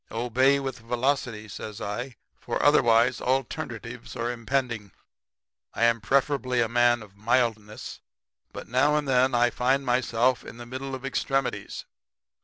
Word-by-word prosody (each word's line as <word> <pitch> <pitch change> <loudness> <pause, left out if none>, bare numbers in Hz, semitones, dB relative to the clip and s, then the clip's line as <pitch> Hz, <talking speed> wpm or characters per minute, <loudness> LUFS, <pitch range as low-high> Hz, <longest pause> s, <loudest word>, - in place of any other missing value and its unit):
Obey 125 +4 +2
with 135 -3 -5
velocity,' 120 -2 -1
says 105 +1 -7
I, 120 +5 -4 0.2
'for - - -3
otherwise 115 +2 +4
alternatives 130 - -3
are 120 +1 -2
impending. 120 -3 -2 0.8
I - - 0
am 115 -1 +3
preferably 130 0 +1
a 115 - +3
man 120 0 +3
of 100 -2 -17
mildness, 110 0 -1 0.5
but - - -8
now 140 +5 +3
and 150 -1 0
then 130 -1 +3
I 120 0 +3
find 135 +2 +1
myself 125 0 +1
in 115 - -10
the 120 - -9
middle 130 +2 -5
of 130 +1 -8
extremities. 135 0 -2
120 Hz, 140 wpm, -26 LUFS, 115-130 Hz, 0.8 s, otherwise